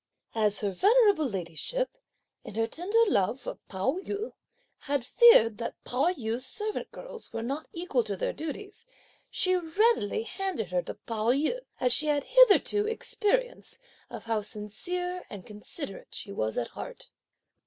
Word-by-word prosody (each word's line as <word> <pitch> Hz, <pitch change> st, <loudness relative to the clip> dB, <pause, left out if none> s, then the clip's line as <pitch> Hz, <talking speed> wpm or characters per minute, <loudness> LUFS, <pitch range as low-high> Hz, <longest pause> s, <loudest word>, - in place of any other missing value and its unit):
As 210 Hz, -2 st, +2 dB
her 205 Hz, -2 st, 0 dB
venerable 405 Hz, -, +4 dB
ladyship, 195 Hz, -, -2 dB, 0.5 s
in 210 Hz, -, -9 dB
her 225 Hz, 0 st, +2 dB
tender 400 Hz, -, +1 dB
love 220 Hz, -, +1 dB
for -, -, -6 dB
Pao 195 Hz, -, -1 dB
yü, 410 Hz, +4 st, -4 dB, 0.5 s
had 280 Hz, -4 st, -1 dB
feared 230 Hz, -, +6 dB
that 230 Hz, -, -4 dB
Pao 275 Hz, +8 st, +2 dB
yü's 240 Hz, -6 st, -3 dB
servant 420 Hz, +11 st, -3 dB
girls -, -, -9 dB
were 225 Hz, -, -4 dB
not 275 Hz, +6 st, -4 dB
equal 335 Hz, -8 st, -1 dB
to 200 Hz, -3 st, -3 dB
their -, -, -1 dB
duties, 395 Hz, -, -7 dB, 0.4 s
she 370 Hz, 0 st, +2 dB
readily 355 Hz, -, +1 dB
handed 350 Hz, -, -4 dB
her 180 Hz, -1 st, +1 dB
to -, -, -7 dB
Pao 225 Hz, 0 st, -2 dB
yü, 300 Hz, -, +2 dB, 0.2 s
as 250 Hz, -2 st, +4 dB
she 305 Hz, +4 st, +5 dB
had 290 Hz, -2 st, +2 dB
hitherto 430 Hz, -, +5 dB
had 450 Hz, -, 0 dB
experience -, -, -1 dB, 0.3 s
of -, -, -8 dB
how 225 Hz, -2 st, 0 dB
sincere 355 Hz, -, -2 dB
and 195 Hz, -3 st, -9 dB
considerate 215 Hz, -, -6 dB
she 200 Hz, -, -5 dB
was 110 Hz, -, -2 dB
at 120 Hz, -, -1 dB
heart. -, -, -9 dB
290 Hz, 155 wpm, -28 LUFS, -, 0.5 s, feared